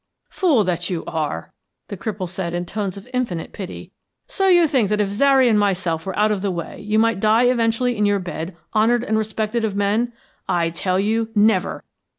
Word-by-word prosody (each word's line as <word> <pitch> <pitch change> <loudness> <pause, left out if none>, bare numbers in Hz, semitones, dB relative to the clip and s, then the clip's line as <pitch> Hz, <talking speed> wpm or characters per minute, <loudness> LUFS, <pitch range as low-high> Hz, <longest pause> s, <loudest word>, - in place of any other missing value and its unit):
"Fool 305 - +3
that 175 -2 -2
you 175 -3 -3
are!" 150 - -4 0.4
the - - -4
cripple 195 -1 -4
said 175 -1 -4
in 175 0 -2
tones 200 0 -4
of 200 - -11
infinite 235 -10 -2
pity. 190 -3 -8 0.4
"So 390 -1 0
you 350 -2 +6
think 260 -10 +1
that 210 0 0
if 205 -2 +1
Zary 265 +4 +4
and 215 -3 +4
myself 185 -5 0
were 190 - -4
out 215 +1 +3
of 205 -3 -1
the 200 - -1
way 170 -3 -5
you 210 +1 -1
might 225 -2 +2
die 220 +3 +4
eventually 245 0 +2
in 210 -1 +2
your 205 0 +2
bed 175 -2 -6 0.2
honored 230 +2 +3
and 220 -3 -1
respected 220 +1 -1
of 210 -3 -1
men? 210 +4 +1 0.4
I 170 -1 +1
tell 185 +2 -1
you, 220 +3 0
never! 205 -3 +2
210 Hz, 200 wpm, -21 LUFS, 185-230 Hz, 0.4 s, you